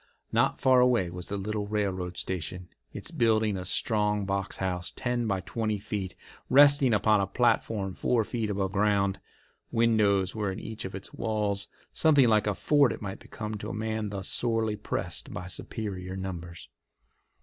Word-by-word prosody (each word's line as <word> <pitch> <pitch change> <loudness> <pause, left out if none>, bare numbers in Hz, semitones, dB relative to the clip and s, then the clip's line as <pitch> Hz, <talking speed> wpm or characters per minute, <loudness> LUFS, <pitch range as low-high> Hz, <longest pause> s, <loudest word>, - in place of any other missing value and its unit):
Not - - +2
far 130 -1 +5
away 120 -8 +3
was 90 0 -6
the 100 - -2
little 105 +1 -3
railroad 95 -4 -2
station, 90 0 -4 0.2
its - - -3
building 110 -3 +2
a 95 - -4
strong 105 +1 +1
box 100 0 -2
house, 90 -2 -2
ten 125 -2 -2
by 95 -3 0
twenty 110 +3 -2
feet, 100 -3 -4 0.3
resting 140 -1 +6
upon 105 -1 +4
a 95 - 0
platform 110 -4 +1
four 115 +5 +1
feet 110 0 -3
above 95 -2 -1
ground. 100 -1 +1 0.5
Windows 105 -5 +3
were 105 -3 -1
in 95 - -5
each 110 -3 -6
of 95 - -6
its 95 - -7
walls. 105 -2 -1 0.2
Something 145 -5 +4
like 105 -1 +3
a 105 - +1
fort 145 +4 +3
it - - -6
might 95 -1 -5
become 110 0 -6
to - - -5
a - - -4
man 110 -1 -2
thus 100 -2 -3
sorely 115 -3 +1
pressed 105 - -4
by 90 - -6
superior 95 -1 -5
numbers. 85 -3 -6
105 Hz, 170 wpm, -28 LUFS, 95-110 Hz, 0.5 s, resting